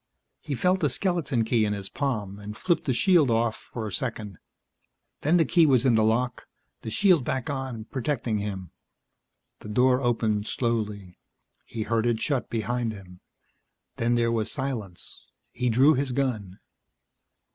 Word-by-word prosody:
He 145 -3 -4
felt 180 +7 +2
the 150 - +2
skeleton 150 - 0
key 115 -1 +2
in 105 -1 0
his 100 -1 -5
palm 105 -9 -3
and 105 +1 -8
flipped 170 +5 0
the 135 - +1
shield 165 0 +4
off 115 -1 +1
for 115 -2 -7
a 105 - -5
second; 105 -4 -4 0.8
then 160 +5 +3
the 165 - +4
key 165 +2 +4
was 130 -3 +3
in 130 - +4
the 110 -1 +4
lock, 120 +3 0 0.3
the - - -6
shield 180 - +3
back 130 +3 -2
on, 130 -5 -4
protecting 120 -4 -2
him. 95 -4 -5 0.9
The - - -10
door 125 +4 +3
opened 110 -4 0
slowly. 105 -6 -2 0.5
He 115 -2 -4
heard 115 +2 0
it 115 -2 +1
shut 135 -3 -1
behind 115 +1 -1
him. 90 -3 -13 0.8
Then 120 +1 +1
there 115 -1 +2
was 110 -2 -1
silence. 115 -10 -6 0.2
He 125 0 -1
drew 130 +7 +5
his 135 -1 -1
gun. 110 -8 -2
120 Hz, 160 wpm, -26 LUFS, 110-135 Hz, 0.9 s, drew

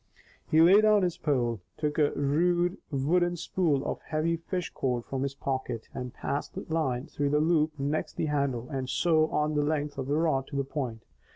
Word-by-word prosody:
He 155 - +4
lay 190 +5 +7
down 215 -2 +4
his 175 -2 0
pole, 120 -7 0 0.2
took 150 0 -1
a 145 -1 +4
rude 175 +6 +1
wooden 175 +5 +1
spool 160 -5 0
of - - -3
heavy 160 +2 0
fish 175 +2 -4
cord 125 -3 -2
from 135 -1 -3
his 140 0 -2
pocket, 130 -5 -3
and 125 -1 -5
passed 140 - -4
the - - -5
line 135 -5 0
through 145 0 -2
the 150 +1 +2
loop 155 -1 +2
next 145 +3 -2
the - - -2
handle 140 -5 -1
and 130 -2 -3
so 160 0 +3
on 150 0 0
the 150 - +2
length 145 -1 -1
of 130 - -3
the 145 - +1
rod 155 -5 +1
to - - -8
the 140 - +1
point. 130 -5 -4
150 Hz, 200 wpm, -28 LUFS, 135-165 Hz, 0.2 s, lay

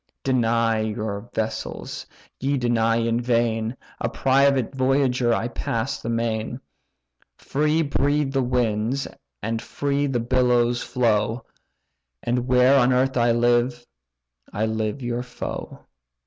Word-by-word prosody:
Deny 115 -3 +2
your 110 0 -3
vessels, 110 0 -4 0.3
ye 140 +2 0
deny 115 -2 +2
in 115 +1 +1
vain: 115 -1 0 0.2
A - - -1
private 135 -1 +2
voyager 130 -2 +2
I 115 0 +1
pass 115 +1 -3
the 115 - -4
main. 115 +1 -2 0.8
Free 155 +3 +1
breathe 145 0 0
the 135 - +2
winds, 120 +1 0 0.4
and 115 +1 -2
free 140 +4 -1
the 130 -3 0
billows 120 0 +2
flow; 115 -1 0 0.8
And 125 +1 -1
where 130 +2 +5
on 125 0 +4
earth 130 +1 +2
I 120 -1 +3
live, 120 +1 +2 0.7
I 105 +2 -1
live 110 +3 -2
your 120 0 -2
foe." 125 - -7
120 Hz, 120 wpm, -23 LUFS, 115-130 Hz, 0.8 s, where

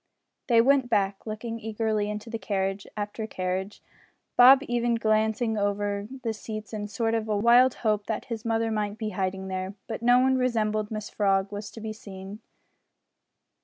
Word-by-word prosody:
They 235 -3 +6
went 265 0 +3
back, 200 -2 0
looking 225 +2 -5
eagerly 215 -1 -1
into 210 +2 -5
carriage 195 -1 -2
after 210 +1 -4
carriage 185 +1 -3 0.5
Bob 260 +2 +8
even 240 0 +1
glancing 220 0 +1
under 205 0 -1 0.2
the 225 -2 -1
seats 215 0 -7
in 210 -1 -3
a - - -5
sort 225 +1 -1
of 225 -1 -1
wild 235 +4 +5
hope 210 -1 +1
that 220 - -3
his 230 -3 -5
mother 225 -1 0
might 210 -1 -2
be 220 -2 -3
hiding 190 -1 -3
there, 190 +1 -4
but 225 -1 -5
no 245 +1 +5
one 260 +1 +3
resembling 215 -4 0
Mrs 215 -1 -6
Frog 195 -1 +1
was 205 0 -6
to - - -11
be 220 0 -4
seen. 195 -1 -9
215 Hz, 165 wpm, -27 LUFS, 205-230 Hz, 0.5 s, Bob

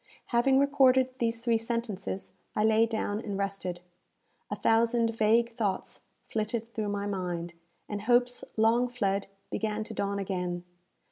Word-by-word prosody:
Having 265 +3 +4
recorded 265 -2 +5
these 230 -1 0
three 230 -2 +3
sentences, 225 -4 -3 0.2
I 210 - +2
lay 220 +1 +4
down 220 -2 -1
and 205 -3 -4
rested. 195 -3 -3 0.7
A - - -2
thousand 230 0 +2
vague 230 +2 +3
thoughts 210 -5 -2 0.3
flitted 225 +1 -3
through 215 -2 -2
my 200 0 -2
mind, 175 -4 -3 0.3
and 205 -1 -4
hopes 245 +2 +2
long 230 +3 +4
fled 200 -5 -1 0.2
began 215 0 -1
to 220 - -8
dawn 200 -1 -1
again. 180 -3 -2
220 Hz, 140 wpm, -29 LUFS, 200-235 Hz, 0.7 s, recorded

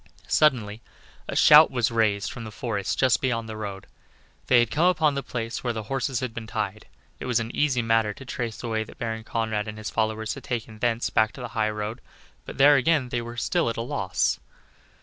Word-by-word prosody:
Suddenly 115 -8 +2 0.5
a - - -4
shout 150 +1 +8
was 120 -2 0
raised 110 -3 +1
from 120 - -7
the 110 - -7
forest 105 -4 -3
just 130 -2 +3
beyond 115 -3 -1
the 110 - -6
road; 100 -3 -6 0.6
they 125 - +5
had 120 -1 +1
come 165 +4 +3
upon 160 -5 +3
the 140 - -2
place 115 -3 -5
where 120 -2 -1
the 110 -1 -4
horses 135 +2 -2
had 125 -3 -3
been 115 -1 -7
tied. 110 -1 -4 0.3
It - - -6
was 125 -1 +2
an 115 +1 -5
easy 130 -5 +1
matter 115 -2 +2
to 135 - -11
trace 120 -3 -4
the 120 - -6
way 110 -1 -1
that 110 - -14
Baron 110 -1 -4
Conrad 110 -2 -2
and 105 0 -6
his 110 -1 -5
followers 110 0 -1
had - - -10
taken 110 -3 -5
thence 120 0 0
back 110 0 +2
to 130 - -10
the 120 - -5
high 110 -1 0
road, 105 +3 -4 0.5
but - - -8
there 145 +1 +7
again 135 -1 +2
they 120 -1 -1
were 120 0 -7
at 115 0 0
a - - -1
loss. 95 -6 -1
115 Hz, 220 wpm, -25 LUFS, 110-125 Hz, 0.6 s, shout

